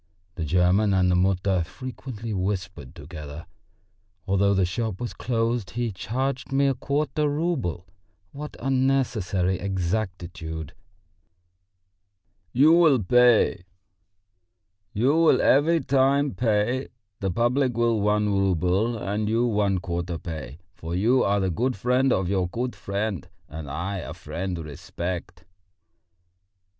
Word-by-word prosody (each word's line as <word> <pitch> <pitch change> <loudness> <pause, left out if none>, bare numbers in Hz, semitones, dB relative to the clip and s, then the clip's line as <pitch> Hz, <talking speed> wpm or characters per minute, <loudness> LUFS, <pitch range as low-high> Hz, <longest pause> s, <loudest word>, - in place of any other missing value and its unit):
The 85 -5 -4
German 90 +5 +3
and 90 -1 +3
the - - +3
Mutter 95 0 +2
frequently 120 0 -7
whispered 95 -7 -3
together. 75 +1 -9 0.8
Although 100 +1 +3
the 95 -1 +3
shop 100 +2 -3
was 120 - -4
closed 115 -3 -1
he 120 -2 0
charged 130 +7 -3
me 140 +1 +3
a 135 - +3
quarter 145 +2 -1
rouble! 145 - -2 0.5
What 150 +1 -8
unnecessary 125 -9 +1
exactitude! 90 -5 -3 1.8
"You 145 +6 +5
will 155 -9 +5 2.4
every 160 +4 +4
time 140 +1 +2
pay; 120 +3 0 0.3
the 95 - -1
public 120 +5 +1
will 115 -2 +2
one 105 0 +2
rouble, 95 +4 +1
and 105 +2 -2
you 115 +2 +2
one 105 -4 +1
quarter 85 -1 -3
pay; 75 -5 -7 0.2
for 85 +1 -6
you 120 +7 +3
are 100 +1 +2
the 95 -1 0
good 125 +8 0
friend 125 +5 +2
of 95 -5 +1
your 95 -1 0
good 120 +7 -3
friend; 100 -4 -3 0.2
and 75 -2 -8
I 90 +7 -3
a 90 - -6
friend 90 0 -4
respect...." 85 +4 -6
100 Hz, 115 wpm, -25 LUFS, 90-125 Hz, 2.4 s, You